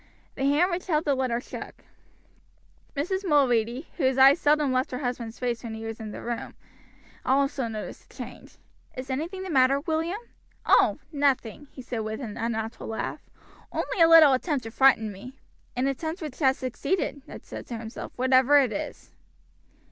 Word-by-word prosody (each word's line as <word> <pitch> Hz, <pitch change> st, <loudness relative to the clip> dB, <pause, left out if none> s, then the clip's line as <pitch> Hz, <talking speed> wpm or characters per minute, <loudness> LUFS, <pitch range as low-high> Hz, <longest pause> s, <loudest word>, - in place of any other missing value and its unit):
The 270 Hz, -, -2 dB
hand 300 Hz, +7 st, +3 dB
which 350 Hz, +2 st, -3 dB
held 315 Hz, -2 st, +1 dB
the 285 Hz, -, +3 dB
letter 255 Hz, -3 st, 0 dB
shook. -, -, -9 dB, 1.1 s
Mrs. 375 Hz, +7 st, -1 dB
Mulready, 260 Hz, -, +2 dB
whose 265 Hz, -5 st, +1 dB
eyes 270 Hz, +4 st, +7 dB
seldom 295 Hz, -3 st, +3 dB
left 255 Hz, +1 st, +1 dB
her 250 Hz, -, -4 dB
husband's 245 Hz, -4 st, -4 dB
face 240 Hz, -2 st, -2 dB
when 225 Hz, -2 st, -5 dB
he 220 Hz, 0 st, -7 dB
was 225 Hz, 0 st, -6 dB
in 220 Hz, -1 st, -6 dB
the -, -, -8 dB
room, 235 Hz, 0 st, -4 dB, 0.7 s
also 275 Hz, -1 st, +1 dB
noticed 215 Hz, -2 st, -7 dB
the -, -, -19 dB
change. -, -, -10 dB, 0.4 s
"Is 255 Hz, +1 st, -5 dB
anything 340 Hz, +8 st, -3 dB
the 375 Hz, -, -5 dB
matter, 270 Hz, 0 st, +4 dB
William?" 325 Hz, +4 st, -1 dB, 0.5 s
"Oh! -, -, +5 dB
nothing," 280 Hz, -2 st, 0 dB
he 255 Hz, -, -11 dB
said 245 Hz, -1 st, -4 dB
with 220 Hz, 0 st, -4 dB
an 230 Hz, -6 st, -6 dB
unnatural 225 Hz, -1 st, -3 dB
laugh, 220 Hz, -, -4 dB, 0.5 s
"only 370 Hz, -, -2 dB
a 330 Hz, -, +7 dB
little 320 Hz, -4 st, +9 dB
attempt 275 Hz, 0 st, 0 dB
to 225 Hz, -, -7 dB
frighten 225 Hz, -4 st, +4 dB
me." 250 Hz, +8 st, -11 dB, 0.4 s
"An 250 Hz, +2 st, 0 dB
attempt 315 Hz, +6 st, -2 dB
which 295 Hz, -4 st, -7 dB
has 265 Hz, -3 st, +3 dB
succeeded," 285 Hz, +4 st, -2 dB
Ned -, -, -10 dB
said -, -, -8 dB
to 235 Hz, -, -5 dB
himself, 225 Hz, +1 st, -7 dB
"whatever 260 Hz, +2 st, +5 dB
it 265 Hz, -5 st, +3 dB
is." -, -, -6 dB
265 Hz, 175 wpm, -26 LUFS, 235-295 Hz, 1.1 s, little